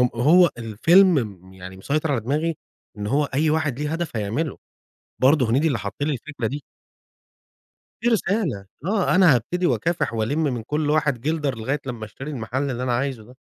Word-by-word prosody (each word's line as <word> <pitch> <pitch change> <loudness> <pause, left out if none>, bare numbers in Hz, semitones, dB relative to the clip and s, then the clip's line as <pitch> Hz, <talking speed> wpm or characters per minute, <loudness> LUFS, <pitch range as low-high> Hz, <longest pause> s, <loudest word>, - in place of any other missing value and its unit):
هو 165 +8 +5
الفيلم 120 - +3
يعني 95 0 -10
مسيطر 150 +9 -1
على 130 - +1
دماغي 150 +6 -1 0.4
إن 105 0 -4
هو 145 +4 +2
أي 145 +3 0
واحد 145 -4 0
ليه 150 +1 -2
هدف 165 -7 -3
هيعمله، 115 +9 -2 0.6
برضو 135 0 +5
هنيدي 135 +8 +2
اللي 135 -6 0
حط 100 0 -5
لي 150 0 0
الفكرة 130 -2 -4
دي. 140 +4 -5 1.4
في 240 - 0
رسالة 190 - 0 0.2
آه، 195 -2 +1
أنا 180 -8 +6
هابتدي 180 +10 -1
وأكافح 170 -7 0
والِم 135 +9 0
من 125 -6 -1
كل 150 +4 -1
واحد 150 -5 +1
جلدر 150 -3 -1
لغاية 135 +6 -2
لمّا 120 -4 -5
أشتري 135 +8 -8
المحل 130 +2 -3
اللي 125 +1 -3
أنا 125 -1 0
عايزه 130 -2 -2
ده. 125 +4 -16
140 Hz, 175 wpm, -23 LUFS, 115-155 Hz, 1.4 s, أنا